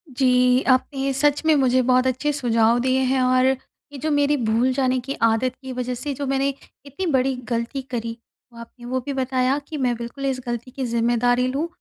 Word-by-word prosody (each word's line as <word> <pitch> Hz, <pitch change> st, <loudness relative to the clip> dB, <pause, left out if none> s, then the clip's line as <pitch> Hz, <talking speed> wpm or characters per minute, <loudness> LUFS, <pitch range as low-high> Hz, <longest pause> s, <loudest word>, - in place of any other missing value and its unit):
जी, 250 Hz, 0 st, +3 dB
आपने 270 Hz, +1 st, +1 dB
सच 290 Hz, +2 st, +2 dB
में 315 Hz, -1 st, +5 dB
मुझे 255 Hz, -2 st, +3 dB
बहुत 255 Hz, +1 st, +3 dB
अच्छे 260 Hz, +4 st, 0 dB
सुझाव 235 Hz, -3 st, +2 dB
दिए 260 Hz, +1 st, +1 dB
हैं, 260 Hz, 0 st, +1 dB
और 255 Hz, 0 st, +3 dB
ये 265 Hz, +2 st, -4 dB
जो 310 Hz, +3 st, -1 dB
मेरी 290 Hz, 0 st, +2 dB
भूल 235 Hz, +2 st, +1 dB
जाने 255 Hz, -1 st, +1 dB
की 270 Hz, +3 st, -5 dB
आदत 230 Hz, +3 st, +2 dB
की 265 Hz, -1 st, -7 dB
वजह 250 Hz, 0 st, -3 dB
से, 280 Hz, +4 st, -4 dB
जो 280 Hz, +1 st, -4 dB
मैंने 275 Hz, +1 st, +1 dB, 0.4 s
इतनी 285 Hz, +7 st, -5 dB
बड़ी 265 Hz, 0 st, +1 dB, 0.2 s
गलती 235 Hz, +4 st, -2 dB
करी। 230 Hz, -1 st, -4 dB, 0.4 s
वो 235 Hz, -, -12 dB
आपने 240 Hz, +1 st, -12 dB
वो 255 Hz, +1 st, -1 dB
भी 280 Hz, -, -3 dB
बताया 260 Hz, 0 st, 0 dB
कि 310 Hz, -, -6 dB
मैं 250 Hz, -3 st, 0 dB
बिल्कुल 235 Hz, +4 st, -6 dB
इस 265 Hz, -1 st, -1 dB
गलती 240 Hz, +1 st, -5 dB
की 265 Hz, -1 st, -4 dB
ज़िम्मेदारी 240 Hz, +2 st, +1 dB
लूँ, 280 Hz, +6 st, -2 dB
255 Hz, 205 wpm, -22 LUFS, 245-270 Hz, 0.4 s, में